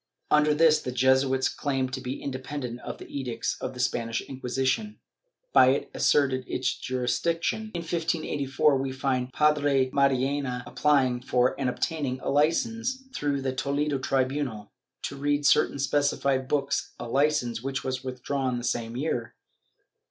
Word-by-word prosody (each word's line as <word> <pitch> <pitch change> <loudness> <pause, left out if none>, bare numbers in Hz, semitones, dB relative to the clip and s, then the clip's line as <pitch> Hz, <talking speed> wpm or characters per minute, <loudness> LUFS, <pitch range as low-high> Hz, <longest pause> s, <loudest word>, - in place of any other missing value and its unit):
Under 150 0 +4
this 155 0 +5
the 125 - -4
Jesuits 130 +1 +3
claimed 135 -3 -2
to 130 - -3
be 130 +1 -4
inde 130 -2 -5
pendent 125 -4 -5
of - - -7
the - - -10
edicts 125 -5 -3
of - - -4
the - - -9
Spanish 115 -2 0
Inquisition, 135 - -2 0.5
but 130 - +7
it 135 - 0
asserted 135 -3 +2
its 130 -1 -1
jurisdiction. 165 - -1
In 170 - -2
1584 155 -4 0
we 135 0 -2
find 130 -1 -1
Padre 145 -3 +2
Mariana 135 -1 +1
applying 130 -5 +2
for 125 -1 +2
and 130 -2 +1
obtaining 140 -2 -2
a - - -3
licence, 230 - +1
through 140 - -1
the 130 -1 -1
Toledo 140 +1 -1
tribunal, 130 -4 -1 0.3
to - - -4
read 145 +1 0
certain 140 - +4
specified 140 -1 +1
books 140 -1 -1
— - - -36
a 120 - -5
licence 130 -3 +1
which 135 +1 -3
was 130 0 -3
withdrawn 130 0 -2
the 120 - -5
same 115 -1 -2
year. 125 -5 -2
135 Hz, 150 wpm, -27 LUFS, 130-145 Hz, 0.5 s, but